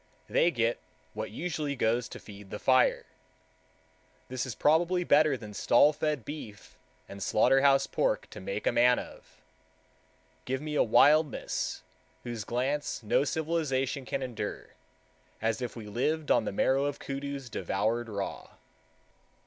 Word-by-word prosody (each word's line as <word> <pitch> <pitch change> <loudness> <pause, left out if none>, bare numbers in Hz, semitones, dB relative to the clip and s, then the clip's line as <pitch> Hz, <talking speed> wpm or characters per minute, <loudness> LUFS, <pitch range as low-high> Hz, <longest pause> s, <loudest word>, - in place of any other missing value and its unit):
They 170 - +3
get 120 -6 0 0.3
what - - -4
usually 150 +2 -3
goes 120 0 0
to - - -8
feed 100 -1 -12
the 105 - -5
fire. 130 +3 +3 1.2
This 130 +1 -3
is 120 - -5
probably 175 +6 +2
better 150 -4 +4
than 105 -3 -10
stall 145 +8 +4
fed 150 -4 -2
beef 115 -9 -9 0.3
and 100 0 -10
slaughterhouse 135 +6 +4
pork - - 0
to - - -9
make - - -4
a - - +3
man 120 +1 +4
of. - - -10 1.1
Give 130 +1 -2
me 150 +1 -5
a 150 - +3
wildness 145 +5 +2 0.4
whose 115 -4 -5
glance 130 +2 -2
no 110 - +2
civilization 145 -3 -1
can 135 - -3
endure,—as 115 0 -6
if 125 - -4
we 115 -3 -8
lived 145 +8 -1
on - - +3
the - - -2
marrow 135 +7 +2
of 145 0 -2
koodoos 140 -1 -5
devoured 110 +6 -1
raw. 100 -2 -5
130 Hz, 140 wpm, -29 LUFS, 115-150 Hz, 1.2 s, better